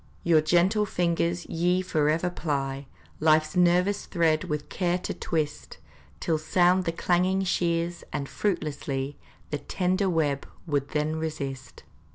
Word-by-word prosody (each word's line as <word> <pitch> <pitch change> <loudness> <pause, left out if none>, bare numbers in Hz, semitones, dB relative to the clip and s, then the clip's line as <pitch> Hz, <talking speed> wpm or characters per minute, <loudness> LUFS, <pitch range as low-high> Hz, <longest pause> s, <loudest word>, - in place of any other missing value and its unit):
Your 165 -2 +5
gentle 180 +7 +3
fingers 170 -1 0
ye 180 +2 +1
forever 160 +1 +1
ply, 140 -4 -3 0.3
Life's 155 +2 +3
nervous 180 +3 +3
thread 160 -3 +2
with 150 -1 -3
care 175 -1 0
to 180 - -4
twist, 150 -3 -3 0.4
Till 160 -2 0
sound 180 +3 +3
the 165 - +1
clanging 180 +3 +1
shears, 170 -1 0
and 140 - -3
fruitlessly 145 -7 -2 0.3
The 150 - -1
tender 185 +4 0
web 150 -5 0 0.2
would 145 -4 -1
then 155 +1 -1
resist. 140 -5 -5
165 Hz, 130 wpm, -27 LUFS, 150-180 Hz, 0.4 s, Your